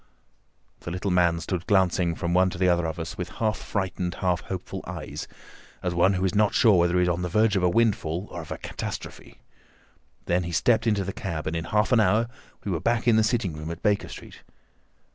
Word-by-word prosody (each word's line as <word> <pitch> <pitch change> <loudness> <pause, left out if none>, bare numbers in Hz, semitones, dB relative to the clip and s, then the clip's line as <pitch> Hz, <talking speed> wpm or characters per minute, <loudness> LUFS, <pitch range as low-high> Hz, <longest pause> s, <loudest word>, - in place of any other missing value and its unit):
The - - -7
little 90 +3 -2
man 85 -2 +3
stood 90 0 -4
glancing 90 -3 +2
from 85 0 -2
one 95 +1 +4
to 90 - -7
the 90 +1 +2
other 85 -2 +2
of 80 - -4
us 80 +1 -6
with 90 - -3
half 110 -1 -1
frightened, 90 -3 -3
half 90 -3 0
hopeful 95 +1 -6
eyes, - - -6 0.6
as 90 -1 -1
one 90 +3 +4
who 95 0 0
is 90 - 0
not 105 0 +2
sure 105 -6 +5
whether 85 +1 +2
he 90 - +4
is - - +1
on 85 0 0
the 90 - -2
verge 110 +3 +3
of 95 - +2
a 90 - +3
windfall 95 -4 +1
or 85 - -5
of 80 - -11
a - - -4
catastrophe. - - -7 0.8
Then 90 +1 +1
he 85 0 -4
stepped 110 +7 +2
into 105 -3 +2
the 95 0 -4
cab, 85 -5 -4
and 80 - -2
in 85 0 -2
half 105 +4 +1
an 120 - +5
hour 110 +3 +3 0.3
we 100 - -3
were 85 - -1
back 115 +5 0
in 115 - +6
the 110 - +4
sitting 110 -6 0
room 75 +1 -6
at 85 0 -7
Baker 105 -1 +1
Street. - - -11
90 Hz, 230 wpm, -26 LUFS, 85-105 Hz, 0.8 s, in